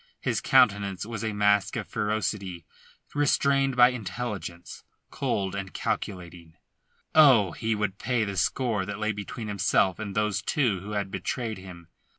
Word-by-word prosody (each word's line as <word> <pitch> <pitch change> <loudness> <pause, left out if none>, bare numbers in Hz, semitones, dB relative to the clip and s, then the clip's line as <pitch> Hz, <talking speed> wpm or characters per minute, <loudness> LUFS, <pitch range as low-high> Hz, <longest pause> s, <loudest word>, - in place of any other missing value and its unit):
His - - -1
countenance 100 -2 +3
was 110 -1 -5
a 110 - -1
mask 105 -1 +2
of - - -4
ferocity 105 -5 -2 0.5
restrained 140 -2 +2
by 125 0 +7
intelligence, 105 -7 -6 0.3
cold 95 -2 -1
and 95 -1 -6
calculating. 85 -4 -4 0.6
Oh, 130 - +6
he 110 +5 -2
would 105 -2 -2
pay 125 -3 0
the 100 -2 -3
score 105 +3 0
that 100 +1 -5
lay 105 +1 0
between 105 +2 -6
himself 100 -1 +1
and 100 -3 -5
those 105 -1 0
two 120 -10 +1
who 100 +3 -7
had 100 -2 -2
betrayed 115 -3 -3
him. 90 -3 -11
105 Hz, 150 wpm, -27 LUFS, 95-115 Hz, 0.6 s, by